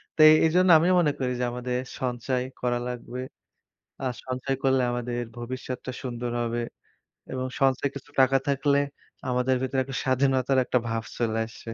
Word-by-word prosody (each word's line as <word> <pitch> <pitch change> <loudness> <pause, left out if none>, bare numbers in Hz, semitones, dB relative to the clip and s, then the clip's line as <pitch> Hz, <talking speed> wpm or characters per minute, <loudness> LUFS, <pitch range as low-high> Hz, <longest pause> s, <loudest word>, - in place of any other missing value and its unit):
তো - - -26
এ - - +9
এইজন্য 180 +3 +4
আমিও 175 +4 +3
মনে 155 -4 +3
করি 130 -1 0
যে - - 0
আমাদের 125 0 -2 0.2
সঞ্চয় 125 0 -1 0.2
করা 120 -1 +1
লাগবে 125 0 -6 0.8
আ - - -5 0.2
সঞ্চয় 130 +1 -2
করলে 135 -1 +3
আমাদের 120 0 -2 0.2
ভবিষ্যৎটা 130 +1 -5
সুন্দর 120 -1 -3
হবে, 120 0 -1 0.7
এবং 130 0 -2 0.2
সঞ্চয় 135 +1 +3
কিছু 140 +1 -9
টাকা 135 +1 +5
থাকলে 140 0 +2 0.5
আমাদের 125 +1 +2
ভেতরে 130 0 0
একটা 135 0 -7
স্বাধীনতার 130 0 +2
একটা 125 - +2
ভাব 115 0 -1
চলে 115 -2 0
আসবে 115 +1 -9
130 Hz, 160 wpm, -26 LUFS, 120-135 Hz, 0.8 s, এ